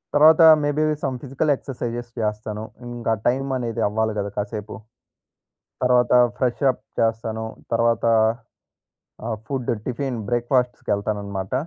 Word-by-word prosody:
తర్వాత 155 +3 +7 0.2
may 145 - +1
be 155 - +3 0.2
some 130 -3 -1
physical 140 +3 0
exercises 120 -2 -5
చేస్తాను. 105 0 -3 0.2
ఇంకా 120 -2 -3 0.2
టైం 130 +3 +2
అనేది 115 -2 -3
అవ్వాలి 110 +1 0
గదా! 100 0 -3
కాసేపు. 105 +1 -4 1.1
తర్వాత 125 -1 +3 0.3
ఫ్రెష్ 125 +2 -1
అప్ - - -15 0.2
చేస్తాను. 110 0 -1 0.3
తర్వాత 115 0 +2 1.2
ఆహ్, 115 -1 -2
ఫుడ్ 135 -4 -3 0.2
టిఫిన్ 125 0 -2
బ్రేక్ 120 0 0
ఫాస్ట్స్ 125 -1 +1
కెళ్తాననమాట. 100 -1 -2
120 Hz, 125 wpm, -23 LUFS, 110-125 Hz, 1.2 s, తర్వాత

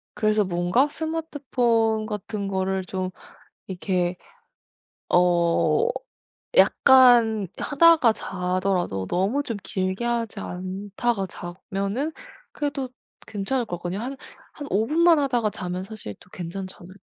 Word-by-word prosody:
그래서 215 -1 +2
뭔가 180 +9 +2
스마트폰 255 -9 0
같은 210 -1 -4
거를 190 0 -1
좀 185 0 -3 0.6
이렇게 180 -1 -1 0.9
어 175 - +3 0.7
약간 240 - +6
하다가 305 -5 +5
자더라도 180 - -2
너무 200 +11 0
좀 230 -6 -4
길게 190 +3 -2
하지 235 -2 -2
않다가 195 +4 -3
자면은 195 - -4 0.4
그래도 285 -3 -3 0.4
괜찮을 225 +5 -2
것 175 - -4
같거든요. 180 +3 -4
한 260 +4 -5 0.4
한 290 - -7
5 215 +3 +2
분만 330 +1 +5
하다가 245 -6 +1
자면 180 -1 -5
사실 195 - -8
또 180 +1 -20
괜찮지 185 +2 -6
않을 175 +2 -12
205 Hz, 240 characters per minute, -24 LUFS, 185-250 Hz, 0.9 s, 약간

